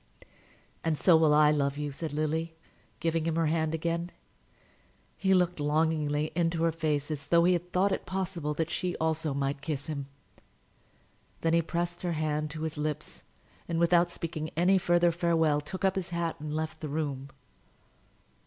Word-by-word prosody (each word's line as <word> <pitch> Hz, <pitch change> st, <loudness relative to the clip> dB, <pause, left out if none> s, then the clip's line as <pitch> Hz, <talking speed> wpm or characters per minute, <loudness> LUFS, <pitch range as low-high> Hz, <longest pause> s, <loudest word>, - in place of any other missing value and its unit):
"And 160 Hz, -2 st, 0 dB
so 175 Hz, +1 st, +5 dB
will 160 Hz, -1 st, +5 dB
I 150 Hz, 0 st, +6 dB
love 140 Hz, -2 st, 0 dB
you," 145 Hz, -1 st, -3 dB
said 155 Hz, +2 st, -5 dB
Lily, 160 Hz, +2 st, -1 dB, 0.4 s
giving 165 Hz, 0 st, 0 dB
him 165 Hz, -1 st, 0 dB
her 165 Hz, 0 st, +2 dB
hand 160 Hz, 0 st, +1 dB
again. 170 Hz, +2 st, -2 dB, 1.1 s
He 190 Hz, -, 0 dB
looked 180 Hz, -2 st, +1 dB
longingly 150 Hz, 0 st, +1 dB
into 165 Hz, 0 st, 0 dB
her 165 Hz, -, +3 dB
face 155 Hz, -2 st, -1 dB
as 150 Hz, -1 st, -5 dB
though 170 Hz, 0 st, +5 dB
he 180 Hz, +1 st, +5 dB
had 175 Hz, 0 st, -3 dB
thought 190 Hz, +2 st, +2 dB
it 190 Hz, -, -3 dB
possible 180 Hz, -5 st, -2 dB
that 160 Hz, +1 st, -1 dB
she 180 Hz, 0 st, -1 dB
also 160 Hz, -2 st, 0 dB
might 140 Hz, 0 st, -1 dB
kiss 145 Hz, -2 st, -3 dB
him: 140 Hz, -3 st, -4 dB, 1.3 s
then 165 Hz, 0 st, +1 dB
he 170 Hz, -, +5 dB
pressed 170 Hz, +1 st, -3 dB
her 175 Hz, -2 st, -1 dB
hand 155 Hz, -1 st, -1 dB
to 155 Hz, +1 st, -6 dB
his 160 Hz, -1 st, -4 dB
lips, 150 Hz, -1 st, -4 dB, 0.5 s
and 170 Hz, -, -2 dB
without 170 Hz, +1 st, +4 dB
speaking 165 Hz, -2 st, -4 dB
any 185 Hz, +3 st, +4 dB
further 175 Hz, -1 st, +3 dB
farewell, 165 Hz, -3 st, +2 dB
took 185 Hz, +6 st, -4 dB
up 190 Hz, -, +3 dB
his 190 Hz, -3 st, -3 dB
hat 170 Hz, -1 st, -2 dB
and 150 Hz, 0 st, -4 dB
left 160 Hz, 0 st, -3 dB
the 155 Hz, -, -5 dB
room. 140 Hz, -3 st, -3 dB
160 Hz, 175 wpm, -29 LUFS, 150-170 Hz, 1.3 s, I